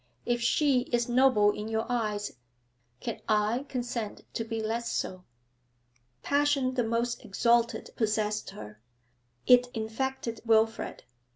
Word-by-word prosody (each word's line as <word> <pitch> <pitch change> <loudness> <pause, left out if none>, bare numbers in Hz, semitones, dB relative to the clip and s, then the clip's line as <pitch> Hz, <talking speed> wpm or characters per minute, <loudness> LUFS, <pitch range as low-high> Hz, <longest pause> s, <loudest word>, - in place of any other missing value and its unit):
If 240 0 0
she 270 +2 +3
is 240 -1 +1
noble 240 -4 +4
in 210 +1 -5
your 225 0 -1
eyes, 215 -4 -1 0.7
can - - -4
I 215 +6 +1
consent 240 -4 -4
to 225 - -2
be 225 0 -4
less 230 +2 -2
so?' 185 -1 -3 1.0
Passion 285 -2 +2
the 250 -2 +1
most 235 +1 -1
exalted 235 +3 +1
possessed 215 -1 0
her. 105 0 -10 0.6
It 250 0 +6
infected 230 +1 -3
Wilfrid. 225 0 +1
230 Hz, 120 wpm, -29 LUFS, 215-245 Hz, 1.0 s, It